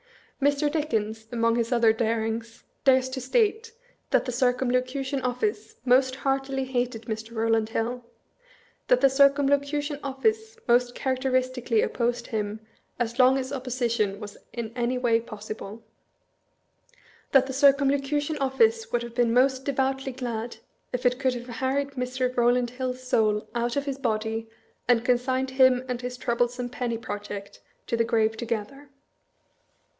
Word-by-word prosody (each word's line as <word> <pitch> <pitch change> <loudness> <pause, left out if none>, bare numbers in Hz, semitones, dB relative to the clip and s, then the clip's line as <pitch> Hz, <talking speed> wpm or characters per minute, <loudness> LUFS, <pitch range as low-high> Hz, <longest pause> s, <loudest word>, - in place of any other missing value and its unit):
Mr. 285 +1 +2
Dickens, 220 -8 -2
among 230 -1 +2
his 230 0 -1
other 235 -2 +4
darings, 225 0 -2 0.2
dares 260 -1 +4
to 260 0 -5
state, 445 - +1 0.4
that - - +2
the 250 - -2
Circumlocution 255 +2 0
Office 340 - -2
most 260 +1 +4
heartily 270 0 -1
hated 245 -3 -2
Mr. 220 0 -5
Eowland 225 -1 +1
Hill; 240 +2 -2 0.8
that - - +4
the 275 - +6
Circumlocution 285 +1 +2
Office 440 +12 -1
most 245 0 +3
characteristically 255 -3 0
opposed 240 0 -1
him 210 -1 -3 0.4
as 240 0 -2
long 260 +1 +6
as 260 +1 -3
opposition 235 -6 -1
was 210 -2 -8 0.2
in 230 -2 -5
any 245 +1 0
way 235 -2 +2
possible; 215 -1 -8 1.5
that 270 -1 +6
the 265 - -5
Circumlocution 280 +2 +2
Office 450 - +2
would 240 - 0
have 235 -1 -8
been 240 -1 +2
most 260 +2 +3
devoutly 270 -1 -1
glad 240 -2 -4 0.3
if 250 0 -3
it 250 +1 +3
could 260 -2 +1
have 240 0 -7
har 260 +2 -2
ried 280 0 0
Mr. 255 -1 -2
Eowland 245 0 +2
Hill' 255 0 -3
s 255 - -15
soul 215 -3 +2
out 235 0 -1
of 280 0 -1
his 275 -1 -3
body, 225 -2 -2 0.4
and 240 -1 +3
consigned 255 +1 +1
him 260 -1 +4
and 250 -1 -3
his 250 0 -5
troublesome 245 0 -1
penny 240 -2 -3
project 205 -2 -7 0.2
to - - -1
the 230 - +2
grave 220 -1 +1
to 235 - -4
gether. 235 +5 -4
250 Hz, 150 wpm, -26 LUFS, 230-270 Hz, 1.5 s, the